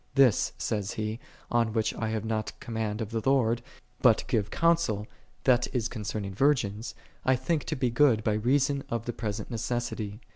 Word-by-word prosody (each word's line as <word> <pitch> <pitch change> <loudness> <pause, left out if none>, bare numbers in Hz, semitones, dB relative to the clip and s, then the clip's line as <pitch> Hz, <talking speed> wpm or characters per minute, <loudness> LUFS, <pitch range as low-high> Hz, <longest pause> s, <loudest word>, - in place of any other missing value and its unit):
' - - -34
This, 120 - +1
saith 105 -3 -2
he, 110 +1 -3 0.3
on 115 -2 +2
which 110 -1 +1
I 110 - -2
have 110 -1 -2
not 110 -1 -3
command 110 -1 -3
of 110 0 -4
the 115 -1 -1
Lord, 120 -4 +3 0.4
but - - +5
give 105 -2 0
counsel, 165 -12 +2 0.4
that 125 -2 +4
is 120 -2 +1
concern 105 -3 -4
ing 95 - -5
virgins, 115 -3 +1 0.3
I 130 - +4
think 145 +4 -1
to 155 - -2
be 130 -3 0
good 115 -3 +4
by 110 - +2
reason 135 +5 +2
of 115 -1 -2
the 120 - -3
present 105 +1 -4
necessity. 115 -3 -3
115 Hz, 185 wpm, -28 LUFS, 110-130 Hz, 0.4 s, but